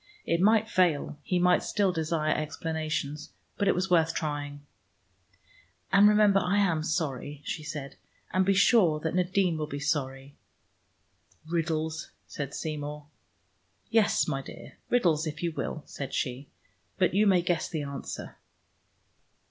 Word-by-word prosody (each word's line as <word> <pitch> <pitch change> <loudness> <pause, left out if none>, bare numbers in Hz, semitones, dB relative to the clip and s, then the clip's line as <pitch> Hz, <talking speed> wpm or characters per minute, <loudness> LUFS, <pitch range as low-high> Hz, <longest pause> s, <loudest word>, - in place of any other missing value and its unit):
It 170 +1 +1
might 220 +2 +4
fail: 170 -8 +1
he 180 - -1
might 180 0 +4
still 200 -3 +1
desire 155 -1 0
explanations, 155 -1 -3 0.2
but 200 - 0
it - - +4
was 180 +1 -1
worth 165 -2 +3
trying. 145 -2 -4 1.3
"And 200 +2 +7
remember 210 -2 +5
I 185 +2 0
am 175 -6 +2
sorry," 150 -3 -3
she 160 - -3
said, 150 -2 -7 0.4
"and 185 +1 +3
be 195 +1 +2
sure 190 -7 +4
that 160 - -2
Nadine 180 -2 +1
will 150 - -2
be 145 -1 -5
sorry." 140 -2 -2 1.1
"Riddles," 160 -1 -2 0.2
said 140 -1 -6
Seymour. 150 -1 -5 0.8
"Yes, 225 -2 +3
my 135 - -1
dear, - - -12
riddles 170 -10 +2
if 155 +2 -6
you 170 - 0
will," 155 -1 -4
said 140 -2 -6
she. 130 +2 -3 0.5
"But - - +2
you 210 +2 +4
may 185 -3 +4
guess 175 -2 0
the 155 -3 -3
answer." 140 -1 -7
160 Hz, 140 wpm, -28 LUFS, 150-185 Hz, 1.3 s, And